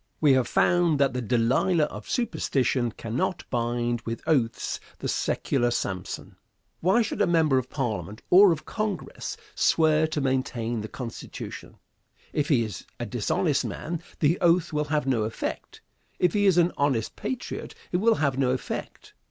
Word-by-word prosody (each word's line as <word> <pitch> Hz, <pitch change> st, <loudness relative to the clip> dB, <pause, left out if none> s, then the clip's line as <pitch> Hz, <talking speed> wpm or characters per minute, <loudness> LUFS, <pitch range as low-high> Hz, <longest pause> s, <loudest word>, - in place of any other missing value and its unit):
We 145 Hz, -3 st, +5 dB
have 130 Hz, -2 st, +2 dB
found 175 Hz, -3 st, +3 dB
that 135 Hz, -2 st, +3 dB
the 125 Hz, -, -2 dB
Delilah 125 Hz, -, +2 dB
of 150 Hz, -, -5 dB
superstition 135 Hz, -, 0 dB
cannot 115 Hz, +11 st, -3 dB
bind 120 Hz, 0 st, 0 dB
with 115 Hz, -1 st, -5 dB
oaths 120 Hz, -7 st, 0 dB, 0.2 s
the -, -, -4 dB
secular 120 Hz, -, 0 dB
Samson. 95 Hz, -6 st, -4 dB, 0.4 s
Why 190 Hz, +8 st, +3 dB
should 210 Hz, -, -3 dB
a -, -, +4 dB
member 160 Hz, -6 st, +3 dB
of 130 Hz, -, -6 dB
Parliament 110 Hz, -, -3 dB
or 190 Hz, +1 st, +8 dB
of 155 Hz, -2 st, -2 dB
Congress 215 Hz, -4 st, -4 dB, 0.2 s
swear 155 Hz, -1 st, +3 dB
to 155 Hz, -1 st, -2 dB
maintain 125 Hz, -4 st, -1 dB
the 105 Hz, -, -5 dB
Constitution? 115 Hz, 0 st, -8 dB, 0.6 s
If 150 Hz, -1 st, 0 dB
he 130 Hz, -6 st, +4 dB
is 105 Hz, -6 st, -7 dB
a -, -, -2 dB
dishonest -, -, 0 dB
man, 165 Hz, +1 st, -4 dB, 0.2 s
the 160 Hz, +3 st, +3 dB
oath 170 Hz, -1 st, +3 dB
will 150 Hz, 0 st, 0 dB
have 150 Hz, -1 st, 0 dB
no 130 Hz, -4 st, +1 dB
effect; 110 Hz, +1 st, -4 dB, 0.4 s
if 180 Hz, -2 st, +2 dB
he 205 Hz, -1 st, +3 dB
is 185 Hz, -3 st, +4 dB
an 175 Hz, 0 st, +4 dB
honest 135 Hz, -6 st, 0 dB
patriot, 255 Hz, -2 st, -5 dB, 0.2 s
it 180 Hz, -, +2 dB
will 225 Hz, +4 st, +4 dB
have 140 Hz, -6 st, 0 dB
no 130 Hz, -2 st, +2 dB
effect. 125 Hz, 0 st, -4 dB
140 Hz, 160 wpm, -26 LUFS, 120-170 Hz, 0.6 s, or